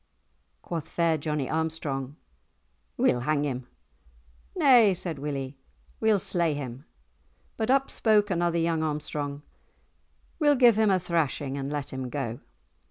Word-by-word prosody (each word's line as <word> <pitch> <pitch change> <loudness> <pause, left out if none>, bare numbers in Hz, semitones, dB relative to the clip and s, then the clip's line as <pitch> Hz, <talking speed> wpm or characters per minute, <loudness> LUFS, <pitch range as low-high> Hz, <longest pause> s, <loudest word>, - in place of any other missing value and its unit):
Quoth 165 -3 -5
fair 170 -1 +1
Johnie 150 -2 -2
Armstrong, 155 -4 -3 0.8
"We'll 125 - +3
hang 145 +3 0
him." 130 -3 -4 0.9
"Nay," 235 -8 +6
said 165 -4 -3
Willie, 135 -2 -4 0.4
"we'll 220 -2 +3
slay 175 -5 0
him." 135 0 -7 0.7
But 220 +1 -2
up 270 +1 +3
spoke 210 -2 +2
another 170 -1 +1
young 165 -1 +1
Armstrong, 150 -2 -3 1.0
"We'll 295 -2 +4
give 245 -4 +6
him 220 -1 +3
a 190 - +4
thrashing 160 -6 -1
and 140 0 -4
let 145 -2 -4
him 130 -1 -4
go." 120 -4 -4
155 Hz, 130 wpm, -27 LUFS, 140-185 Hz, 1.0 s, Nay